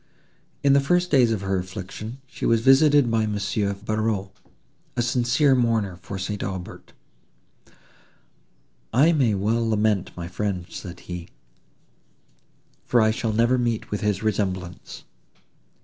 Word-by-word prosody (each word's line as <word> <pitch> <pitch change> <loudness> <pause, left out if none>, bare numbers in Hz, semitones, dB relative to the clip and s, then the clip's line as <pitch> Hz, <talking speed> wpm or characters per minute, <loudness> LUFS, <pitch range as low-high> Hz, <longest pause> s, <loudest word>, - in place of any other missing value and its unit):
In 140 -1 +5
the 140 - +6
first 175 +6 +1
days 125 -5 +4
of 110 -4 -1
her 95 -1 0
affliction, 95 +5 -7
she - - -11
was 115 -1 +3
visited 135 0 +5
by 110 -1 +1
Monsieur 100 -1 -1
Barreaux, 110 -1 -2 0.7
a - - +2
sincere 125 +4 +2
mourner 115 -7 +1
for 95 +2 -7
St. 100 +2 -4
Aubert. 95 -2 -6 2.0
"I 145 +8 +5
may 130 -10 +2
well 110 +4 0
lament 105 -3 +1
my 85 -1 -5
friend," 90 0 -3
said 90 -2 -8
he, 90 -1 -7 1.5
"for 120 - +2
I 110 -1 +4
shall 115 -1 -2
never 120 +4 +2
meet 120 -2 -2
with 105 - -2
his 105 -1 -1
resemblance. 95 -4 -3
110 Hz, 135 wpm, -24 LUFS, 95-120 Hz, 2.0 s, the